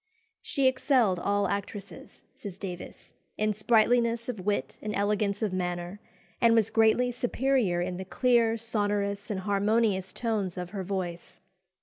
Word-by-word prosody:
"She 275 - 0
excelled 255 - +3
all 200 +2 +1
actresses," 200 +1 -6
says 195 -3 -9
Davies, 180 -3 -8 0.3
"in 215 0 +1
sprightliness 235 +2 +2
of 215 -7 -4
wit 205 +1 -1
and 210 0 -3
elegance 205 +1 0
of 205 -4 -1
manner, 180 +1 -3 0.4
and 230 -1 +5
was 225 -2 +2
greatly 225 +3 +3
superior 245 -6 0
in 180 0 -3
the 190 - -6
clear, 230 +1 +2
sonorous, 205 -2 -2
and 195 -3 -2
harmonious 205 -1 +1
tones 210 -6 -2
of 180 -1 -5
her 200 -2 -4
voice." 180 -3 -5
205 Hz, 140 wpm, -28 LUFS, 190-230 Hz, 0.4 s, and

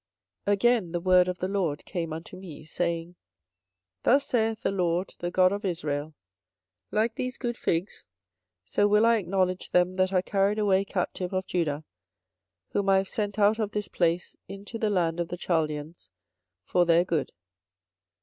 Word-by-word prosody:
24:024:004 205 - +4
Again 210 -3 +2
the 175 - 0
word 180 0 +4
of 180 0 -2
the 185 - -2
LORD 185 -7 -1
came 170 -4 -3
unto 165 +3 -7
me, 180 -5 -10
saying, 170 +1 -2
24:024:005 180 - -21 0.9
Thus 275 +3 +4
saith 225 -2 0
the - - +1
LORD, 180 -1 0
the 175 - -2
God 185 +1 +4
of 205 +2 -3
Israel; 155 -5 -3 0.7
Like 220 +2 +1
these 255 +2 -4
good 240 -2 -3
figs, 175 0 -2 0.6
so 205 - +2
will 210 +2 +4
I 230 0 +5
acknowledge 185 -1 -1
them 180 +1 +2
that 185 0 +2
are 185 -1 +2
carried 200 +1 +1
away 200 -2 +2
captive 180 -1 -3
of 185 0 -1
Judah, 155 -4 -1 0.9
whom 200 -1 0
I 195 - +6
have 190 0 0
sent 205 -3 -2
out 210 +2 +4
of 210 -2 -2
this 210 -1 -3
place 170 0 0
into 200 +4 -8
the 220 - +1
land 175 -4 +1
of 170 - -1
the 175 - -5
Chaldeans 155 - -2 0.5
for 180 - +2
their 170 0 +4
good. 160 -7 -1
185 Hz, 175 wpm, -27 LUFS, 170-205 Hz, 0.9 s, I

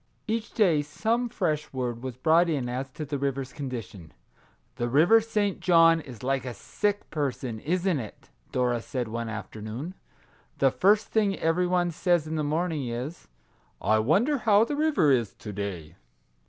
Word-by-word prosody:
Each 225 +1 -2
day 175 -10 +3
some 225 +11 -1
fresh 160 -9 -1
word 125 -3 -3
was 130 -2 -5
brought 165 +5 +4
in 140 -6 -1
as 130 +2 -3
to 155 - -5
the 145 -1 -3
river's 135 -1 -2
condition. 115 - -7 0.3
" - - -36
The 120 - -1
River 165 - +5
St. 210 -3 -1
John 165 -2 +5
is 125 -6 -11
like 135 +1 0
a 125 -2 -6
sick 205 - -2
person, 130 -6 -3
isn't 175 - 0
it?" 110 -4 -10 0.2
Dora 125 -2 +1
said 125 0 -3
one 115 0 -3
afternoon. 110 - -6 0.3
" - - -34
The - - +4
first 205 +3 +3
thing 205 -3 +1
every 170 +3 +1
one 175 -1 +1
says 175 -1 +1
in 155 - -5
the 155 -1 -1
morning 155 -2 -1
is, 125 +8 -5 0.3
( - - -37 0.2
I 110 +1 +2
wonder 205 - +2
how 215 -1 +5
the 290 - -3
river 290 - +3
is 120 -6 +1
to 105 - -8
day.' 95 -5 -5
150 Hz, 180 wpm, -27 LUFS, 120-180 Hz, 0.3 s, River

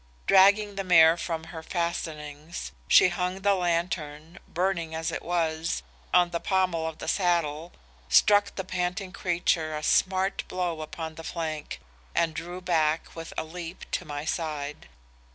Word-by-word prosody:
Dragging 200 +2 +5
the 195 - -1
mare 165 -3 +7
from 165 -1 -4
her 160 - -6
fastenings, 160 - -4 0.2
she 180 - +7
hung 180 +2 -2
the 200 +1 +4
lantern, 170 -2 -2
burning 170 -2 -1
as 160 +1 -2
it - - -4
was, 165 -1 -1 0.3
on 175 -1 +4
the 170 - -1
pommel 185 -4 +1
of 160 -1 -6
the - - -7
saddle, 170 -3 0 0.4
struck 205 -1 +5
the 190 - -3
panting 185 +1 -3
creature 170 -4 0
a 150 - -6
smart 190 +3 +2
blow 175 -3 -2
upon 160 +1 -6
the 165 +1 -10
flank, 160 -3 -4 0.4
and 165 -1 +2
drew 175 +3 -6
back 160 -3 0
with 165 -1 -7
a - - 0
leap 170 +2 -8
to - - -1
my 145 0 -5
side. 150 - -4
170 Hz, 150 wpm, -27 LUFS, 160-180 Hz, 0.4 s, mare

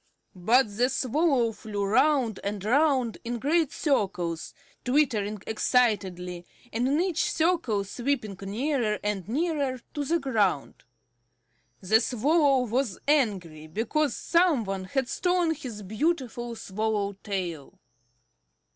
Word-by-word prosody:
But 210 +3 +2
the 250 +2 +3
Swallow 265 -2 +1
flew 205 -2 -4
round 235 0 +2
and 200 -1 -4
round 260 -1 +2
in 240 +1 -3
great 310 +4 +1
circles, 180 - -1 0.3
twittering 245 -6 +1
excitedly, 190 -7 0 0.3
and 240 +3 +1
in 285 +3 +2
each 360 -2 0
circle 315 - +1
sweeping 240 0 -2
nearer 220 +2 -1
and 205 -2 -2
nearer 285 -2 -1
to 290 - -2
the 330 +5 +1
ground. 215 - -1 1.0
The 215 +4 +4
Swallow 270 +2 +2
was 240 -3 -1
angry 190 - 0
because 235 - 0
some 335 -8 +2
one 195 -2 -4
had 265 +6 -1
stolen 355 +2 +1
his 245 -9 -8
beautiful 240 - -2
swallow 210 -1 -2
tail. 180 -8 -4
235 Hz, 115 wpm, -27 LUFS, 205-285 Hz, 1.0 s, The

